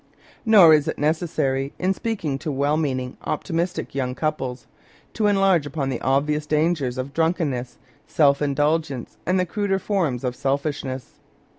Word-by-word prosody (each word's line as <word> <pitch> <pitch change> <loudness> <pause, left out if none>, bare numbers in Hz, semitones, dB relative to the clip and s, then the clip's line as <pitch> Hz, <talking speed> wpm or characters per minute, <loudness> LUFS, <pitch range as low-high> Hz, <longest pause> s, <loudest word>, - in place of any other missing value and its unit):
Nor 195 -8 +8
is 150 -2 +3
it - - -2
necessary, 145 -3 0
in 185 +1 +1
speaking 185 -11 -3
to 155 +1 -3
well 140 +2 +1
meaning, 130 -5 -2
optimistic 170 +4 -2
young 130 -2 -2
couples, 130 -5 -3 0.5
to 215 -1 +1
enlarge 195 -6 +3
upon 140 -2 -3
the 130 - -3
obvious 150 +3 0
dangers 150 -5 0
of 130 +2 -4
drunkenness, 160 -7 -1 0.3
self 140 -2 +3
indulgence, 145 -2 -1
and 185 +1 +2
the 180 - +1
cruder 195 +2 -1
forms 175 - -1
of 125 -1 -2
selfishness. 140 -2 -3
150 Hz, 145 wpm, -23 LUFS, 135-170 Hz, 0.5 s, Nor